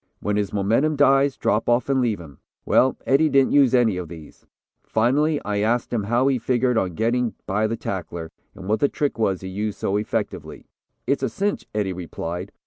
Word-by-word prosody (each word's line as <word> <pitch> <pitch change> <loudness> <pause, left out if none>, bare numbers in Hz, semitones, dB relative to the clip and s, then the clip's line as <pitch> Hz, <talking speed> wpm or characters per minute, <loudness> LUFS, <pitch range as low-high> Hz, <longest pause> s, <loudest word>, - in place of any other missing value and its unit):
When 105 0 -1
his 105 -1 -1
momentum 115 +10 +1
dies, 135 0 +3
drop 110 +3 0
off 120 0 +2
and 135 -1 +2
leave 115 -6 0
him. 75 -6 -13 0.3
Well, 130 - +3
Eddie 145 +4 +3
didn't 135 -2 +3
use 135 -3 +5
any 115 -6 +3
of 90 -2 -5
these. 80 -2 -13 0.4
Finally 145 +7 +1
I 105 -1 -1
asked 115 +4 0
him 110 -4 -1
how 120 +5 +2
he 135 -2 +2
figured 125 +1 +1
on 95 -6 0
getting 120 +2 0
by 105 +2 0
the 115 +1 -3
tackler, 85 -3 -5 0.2
and 95 - -10
what 110 +2 +1
the 145 - +2
trick 145 -5 -2
was 95 -4 0
he 95 - -6
used 105 +2 -3
so 100 - -1
effectively. 105 0 -4 0.4
"'It's 140 +3 0
a - - 0
cinch,' 205 0 -2
Eddie 100 -3 0
replied. 90 +1 -6
110 Hz, 200 wpm, -23 LUFS, 95-130 Hz, 0.4 s, use